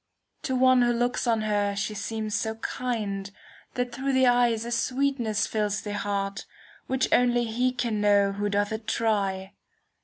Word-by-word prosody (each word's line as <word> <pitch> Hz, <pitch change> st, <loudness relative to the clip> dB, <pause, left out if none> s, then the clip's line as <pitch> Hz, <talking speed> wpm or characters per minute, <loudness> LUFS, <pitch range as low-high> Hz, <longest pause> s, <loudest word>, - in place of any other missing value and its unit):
To 260 Hz, -, -2 dB
one 255 Hz, 0 st, +5 dB
who 240 Hz, 0 st, +3 dB
looks 245 Hz, +1 st, 0 dB
on 225 Hz, -2 st, +2 dB
her 205 Hz, -1 st, 0 dB
she 205 Hz, +2 st, -2 dB
seems 215 Hz, +1 st, -4 dB
so 220 Hz, +1 st, -1 dB
kind. 215 Hz, -5 st, -3 dB, 0.5 s
That 245 Hz, -1 st, -1 dB
through 270 Hz, +3 st, -2 dB
the 260 Hz, 0 st, +4 dB
eyes 240 Hz, -2 st, +3 dB
a 235 Hz, -, -5 dB
sweetness 245 Hz, -2 st, 0 dB
fills 210 Hz, -1 st, -1 dB
the 205 Hz, -, -4 dB
heart, 200 Hz, -1 st, -3 dB
i" -, -, -30 dB, 0.3 s
Which 260 Hz, 0 st, +1 dB
only 245 Hz, -1 st, +3 dB
he 240 Hz, +3 st, 0 dB
can 235 Hz, -4 st, -2 dB
know 200 Hz, -1 st, +4 dB
who 205 Hz, +1 st, -2 dB
doth 205 Hz, +1 st, 0 dB
it 220 Hz, 0 st, -5 dB
try. 195 Hz, -4 st, -1 dB
225 Hz, 175 wpm, -26 LUFS, 205-245 Hz, 0.5 s, one